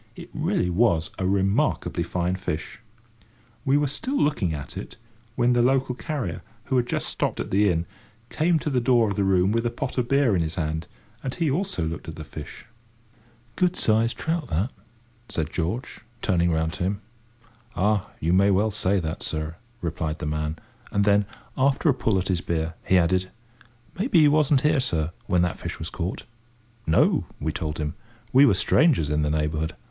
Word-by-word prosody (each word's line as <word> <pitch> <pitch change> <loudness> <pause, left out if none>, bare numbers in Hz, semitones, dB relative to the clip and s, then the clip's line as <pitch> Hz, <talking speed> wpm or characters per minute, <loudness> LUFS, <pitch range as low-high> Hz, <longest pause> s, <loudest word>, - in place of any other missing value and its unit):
It - - -10
really 90 - 0
was 85 -5 +2
a 95 - 0
remarkably 95 -2 +1
fine 90 +1 -1
fish. 85 -4 -4 0.8
We 135 +2 +3
were 145 - +2
still 255 - -2
looking 140 - +1
at 70 -3 -6
it, - - -7 0.4
when 125 0 +3
the 120 - +3
local 130 +1 +2
carrier, 125 - -4 0.2
who 130 - 0
had 120 -1 +1
just - - -1
stopped - - -2
at - - -4
the 100 +1 +4
inn, 85 -1 0 0.5
came 165 +2 +2
to 150 -1 -2
the 125 -2 +2
door 120 -2 +4
of 100 - -2
the 100 - +1
room 95 0 +3
with 115 +1 +1
a 120 - +1
pot 130 +2 -3
of 120 - 0
beer 135 -6 +3
in 85 - +2
his 80 0 -2
hand, 80 -1 -2 0.3
and 130 - -4
he 165 -5 +1
also 165 - -1
looked 80 +1 -5
at 80 - -6
the 80 - -7
fish. 75 +7 -9 0.9
"Good 180 -1 +2
sized 115 +2 +2
trout, 160 -3 -1
that," 95 +11 0 0.6
said 80 -6 -2
George, 90 +9 -3 0.2
turning 85 -3 +2
round 80 0 0
to - - -3
him. 100 +2 -1 0.7
"Ah! 105 0 +1
you 85 +3 +1
may 100 +2 +5
well 100 +3 +3
say 100 -1 +1
that, 80 -2 -4
sir," 80 +1 -3 0.2
replied 80 -2 -2
the - - -5
man; 75 +1 -2 0.3
and 100 0 +2
then, 100 -1 +4 0.3
after 140 +4 +2
a - - +5
pull 110 -5 +1
at 95 +1 -1
his 90 -2 0
beer, 80 -1 -2
he 95 - +5
added, 90 +1 +2 0.7
"Maybe 210 -2 +2
you 150 -2 +6
wasn't 150 -3 +4
here, 150 0 +3
sir, 85 -11 0 0.2
when 90 -1 +3
that 90 - -1
fish - - -5
was 80 - -5
caught?" 90 +1 -4 0.6
"No," 80 - +3
we 80 +2 -1
told 75 0 -3
him. 75 0 -2 0.4
We 135 +2 +8
were 105 - +4
strangers 110 - +3
in 75 0 +1
the 75 - +1
neighbourhood. 75 +1 -1
95 Hz, 195 wpm, -25 LUFS, 80-125 Hz, 0.9 s, We